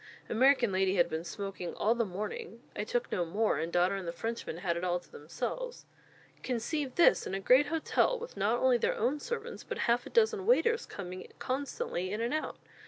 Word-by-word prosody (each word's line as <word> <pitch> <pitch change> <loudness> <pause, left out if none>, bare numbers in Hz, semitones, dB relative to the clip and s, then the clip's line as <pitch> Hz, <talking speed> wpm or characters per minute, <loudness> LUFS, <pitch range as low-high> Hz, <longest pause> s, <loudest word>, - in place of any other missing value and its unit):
American 250 -1 +4
lady 190 0 +2
had 175 -2 +4
been 160 0 -3
smoking 195 -1 -5
all 220 - +2
the 235 -1 +1
morning. 215 - -5
I - - -2
took - - -1
no 180 - +1
more; 200 0 +1
and 165 +2 -2
daughter 175 +2 +3
and 195 -3 -4
the - - -1
Frenchmen 225 -1 -4
had 175 -1 -1
it 170 - -4
all 180 -1 +1
to - - -22
themselves. 365 - -5 0.6
Conceive 260 +3 -2
this 345 - +5
in 190 - -3
a - - -1
great 255 +8 +5
hotel, 325 +10 +1
with 485 +1 -8
not - - +1
only - - +4
their 475 +2 +1
own 295 - +1
servants, 475 +4 -5
but - - -5
half 240 +1 +2
a - - -8
dozen 440 -3 +2
waiters 465 -1 +3
coming 185 -2 -7
constantly 255 -9 -3
in 210 - -2
and 235 +3 -1
out! 310 - -2
235 Hz, 205 wpm, -31 LUFS, -, 0.6 s, this